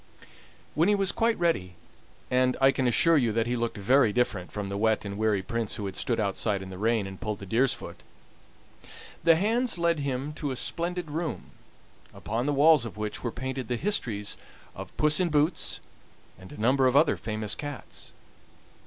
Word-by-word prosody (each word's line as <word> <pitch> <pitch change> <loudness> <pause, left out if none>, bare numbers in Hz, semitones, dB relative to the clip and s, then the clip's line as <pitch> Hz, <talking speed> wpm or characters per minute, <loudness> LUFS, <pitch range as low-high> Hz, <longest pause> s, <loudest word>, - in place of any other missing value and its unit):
When 165 +6 +2
he 210 - +4
was 195 -1 +1
quite 230 0 +1
ready 130 - 0 0.6
and 125 0 +2
I 135 0 +6
can 130 -1 0
assure 165 +7 +4
you 120 -5 +2
that 115 0 +1
he 120 +1 -1
looked 120 -2 -2
very 115 +3 +3
different 105 -6 -1
from 105 -1 -4
the 100 - -4
wet 110 0 +1
and 100 0 -5
weary 105 -2 0
Prince 115 +1 -3
who 105 - -5
had 95 -1 -5
stood 115 +2 -1
outside 100 -1 -1
in 95 - -9
the 95 - -8
rain, 110 -1 +1
and 95 -1 -9
pulled 105 -3 -3
the 100 - -9
deer's 120 +7 +2
foot - - -7 1.2
the 165 -1 +6
hands 225 +5 +1
led 170 -2 +1
him 140 +1 -3
to 150 - -3
a 130 - -3
splendid 170 +3 -2
room, 160 0 -4 0.6
upon 115 +5 -3
the - - +2
walls 150 -1 +5
of 115 -3 -7
which 105 -1 -4
were 120 - -2
painted 130 0 -5
the 120 - -1
histories 115 - -1 0.4
of - - -10
Puss 150 0 +3
in 180 -2 +1
Boots 150 +2 0 0.6
and 95 0 -13
a - - -11
number 130 +4 +3
of 130 - +1
other 150 +2 +5
famous 110 -1 -3
cats. 145 -2 -7
125 Hz, 195 wpm, -27 LUFS, 105-150 Hz, 1.2 s, I